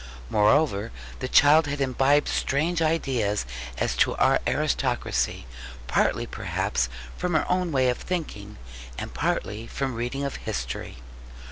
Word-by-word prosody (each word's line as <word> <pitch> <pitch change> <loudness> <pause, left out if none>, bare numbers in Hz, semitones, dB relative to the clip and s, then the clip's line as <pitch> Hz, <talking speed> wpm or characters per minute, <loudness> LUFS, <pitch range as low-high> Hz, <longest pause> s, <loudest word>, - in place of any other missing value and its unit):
Moreover, 110 0 +3 0.3
the 130 - -3
child 145 +3 +6
had 145 0 -3
imbibed 135 +2 +3
strange 165 +5 0
ideas 130 - 0 0.3
as - - 0
to - - +3
our - - +3
aristocracy, 60 -1 0 0.4
partly 60 - +1
perhaps 65 0 -2 0.3
from 180 -2 -1
her 155 - +2
own 180 -1 0
way 130 -3 +2
of 125 - 0
thinking, 150 - -5 0.4
and - - -6
partly 110 +2 -2
from 135 +1 -3
reading 125 +4 -3
of 140 - -3
history. 60 0 -5
135 Hz, 130 wpm, -26 LUFS, 105-155 Hz, 0.4 s, child